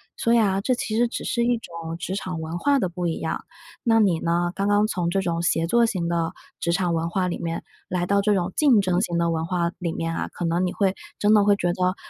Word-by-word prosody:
所 230 +1 +2
以 - - +5
啊， 195 -3 +2
这 255 +5 +1
其 220 -2 -3
实 240 +2 +3
只 235 - -5
是 235 - 0
一 240 0 +2
种 165 -5 -7
职 185 +2 -4
场 185 -4 -4
文 160 +2 -4
化 285 -1 +3
的 190 -8 +1
不 175 0 -3
一 165 - -2
样。 160 - -3 0.4
那 225 -2 +4
你 185 -6 +3
呢， 175 +1 0
刚 200 - 0
刚 205 +1 +4
从 180 -5 -1
这 195 +2 +1
种 170 -2 -1
协 165 -1 +1
作 235 +5 +3
型 180 -6 -2
的 170 -1 -1 0.3
职 170 - 0
场 175 -1 +1
文 165 +1 -1
化 180 +1 0
里 175 - -3
面， 165 -1 -3 0.3
来 180 -1 0
到 200 +1 +2
这 210 0 +2
种 180 0 -1
竞 275 -8 +5
争 185 -2 +1
型 175 -5 -1
的 170 0 +1
文 160 0 -1
化 175 -1 0
里 175 -3 -2
面 165 0 -3
啊， - - -2
可 175 - -4
能 170 +2 +1
你 180 - -2
会 195 -2 +1 0.2
真 210 +1 +3
的 210 -1 +6
会 205 0 +4
觉 175 -3 -1
得 185 0 0
180 Hz, 290 characters per minute, -24 LUFS, 170-205 Hz, 0.4 s, 的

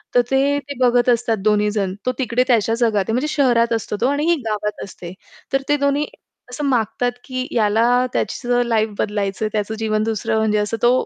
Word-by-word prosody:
तर 245 - +7
ते, 280 +2 +2
ते 280 0 -8
बघत 245 0 +3
असतात 230 -2 +2
दोन्ही 210 0 +3
जण. 195 -3 -1
तो - - +3
तिकडे 250 -1 +1
त्याच्या 225 -2 +2
जगात 215 -4 +2
आहे 225 - -1
म्हणजे 260 +5 0
शहरात 235 -4 +3
असतो 210 -2 -2
तो, 250 - +3
आणि 285 +2 0
ही - - +4
गावात 210 -1 -3
असते. 180 -2 -10 0.4
तर 270 - +2
ते 295 - +3
दोन्ही 285 +1 +1 0.5
असं 290 +3 -4
मागतात, 245 -1 0
की 255 0 -4
याला 230 +3 +3
त्याचं 245 -1 0
लाईफ 220 -1 +1
बदलायचं 205 0 -1
आहे, - - -1
त्याचं 215 +1 -2
जीवन 215 -1 0
दुसरं 220 0 -1
म्हणजे 215 -1 +1
असं 210 +2 -1
तो 240 - +6
230 Hz, 200 wpm, -20 LUFS, 215-255 Hz, 0.5 s, तर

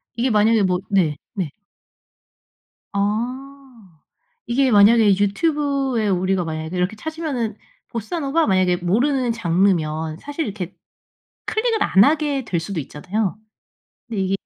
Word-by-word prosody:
이게 240 +3 0
만약에 215 -1 +3
뭐 180 -1 +1
네. 180 -7 +2 0.2
네. 185 -7 -2 1.4
아. 235 - -4 0.5
이게 260 +3 +2
만약에 205 -1 +6
유튜브에 275 +1 0
우리가 185 0 +1
만약에 160 +1 -5
이렇게 180 +4 0
찾으면은 270 -5 -4 0.3
보사노바 280 - -1
만약에 185 -3 +2
모르는 240 +8 +1
장르면 165 -6 0
사실 290 +2 -4
이렇게 195 -5 -6 0.7
클릭을 445 0 0
안 190 +2 +5
하게 290 -1 +1
될 175 - -1
수도 175 +1 -4
있잖아요. 185 +9 -3 0.7
근데 220 -4 -3
이게 190 +1 0
210 Hz, 275 characters per minute, -21 LUFS, 185-270 Hz, 1.4 s, 만약에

